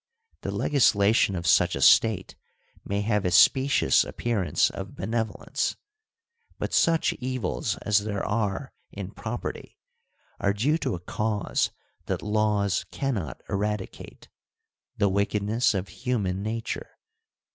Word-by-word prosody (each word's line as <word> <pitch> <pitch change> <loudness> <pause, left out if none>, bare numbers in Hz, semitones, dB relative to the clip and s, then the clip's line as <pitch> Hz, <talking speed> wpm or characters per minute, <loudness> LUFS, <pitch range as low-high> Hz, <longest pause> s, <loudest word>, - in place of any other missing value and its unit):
The - - -4
legislation 105 -7 +3
of 85 -1 -4
such 90 +1 +4
a - - -3
State 105 +4 +4 0.5
may 100 +1 -2
have 105 -1 0
a 90 - +1
specious 130 +9 +5
appearance 115 -7 0
of - - -7
benevolence, 110 -1 -2 0.8
but - - -4
such 165 -1 +3
evils 130 -6 -2
as 105 -1 +3
there 100 -1 -3
are 105 -2 -2 0.2
in - - -7
property - - -6 0.6
are 100 - +1
due 140 +11 +1
to 130 - -1
a - - -6
cause 105 +3 -1 0.4
that - - -2
laws 105 -2 +1
cannot 120 - -3
eradicate: 105 0 -4 0.7
the 100 - +3
wickedness 105 +3 +1
of 95 0 -3
human 105 -7 -2
nature. 110 +2 -5
105 Hz, 120 wpm, -26 LUFS, 100-115 Hz, 0.8 s, specious